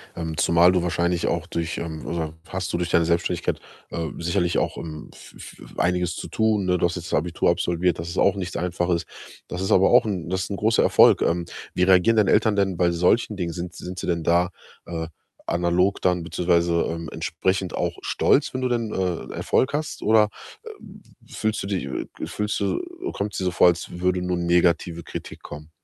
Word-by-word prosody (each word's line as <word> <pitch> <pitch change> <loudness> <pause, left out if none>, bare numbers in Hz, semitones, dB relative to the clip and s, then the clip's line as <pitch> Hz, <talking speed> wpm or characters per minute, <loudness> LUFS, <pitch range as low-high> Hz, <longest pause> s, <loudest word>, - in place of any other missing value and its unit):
ähm, 80 -2 -4
zumal 85 +2 +5
du 90 -2 +1
wahrscheinlich 85 0 0
auch 85 0 -1
durch, 85 -2 -3
ähm 80 -2 -6
oder 80 -2 -3 0.2
hast 95 -1 -3
du - - -1
durch 90 -1 -2
deine 85 - +4
Selbstständigkeit, 85 +1 0 0.3
äh, 80 -1 -3
sicherlich 85 +1 0
auch, - - -2
ähm, 75 -2 -7
v - - -15 0.3
v - - -11
einiges 90 0 +1
zu - - -6
tun, 110 -3 +1
ne? 90 0 +2
Du 85 - +1
hast 90 +1 -1
jetzt 90 +1 -7
Abitur 85 +3 +1
absolviert, 90 0 +1
das 85 +1 -5
ist 85 - -6
auch 100 - +4
nichts 90 -3 -5
Einfaches. 85 -1 -1 0.4
Das 90 - -5
ist 95 - -1
aber 95 +1 +5
auch 120 - +6
'n 90 -6 -3
das 95 +1 -1
ist - - -6
'n 100 - -1
großer 110 +3 +3
Erfolg, - - +6
ähm, 85 0 0 0.3
wie - - -2
reagieren 95 +4 +5
deine 105 -3 +4
Eltern 110 -1 +3
denn 95 -3 +1
bei 90 -1 +3
solchen 90 +5 +2
Dingen? 85 -3 -2
Sind 90 0 -6
sind 90 +1 -7
sie - - -4
denn 85 -2 0
da, 85 +2 +3 0.4
äh, 80 -2 -4 0.4
analog 90 +3 +1
dann 90 -1 +2
beziehungsweise, 85 -1 +1
ähm, 85 -1 -5
entsprechend 95 +3 -1
auch 85 -1 -2
stolz, 140 - +2
wenn 130 - -3
du 125 - 0
denn, 115 -3 -1
äh, 90 -3 -2
Erfolg 130 - +1
hast? 155 +1 -3
Oder, 110 -1 +4 0.3
äh, - - -9 0.6
fühlst 110 0 -1
du - - -5
dich 95 -7 -2 0.4
fühlst 105 0 -2
du 100 - 0 0.3
kommt's 105 - -3
dir 95 - -2
so 90 - +1
vor, 90 - +5
als 85 0 -1
würde 90 0 +1
nur 90 0 -1
negative 85 -1 +1
Kritik - - -8
kommen? 75 +1 -9
90 Hz, 205 wpm, -24 LUFS, 85-95 Hz, 0.6 s, auch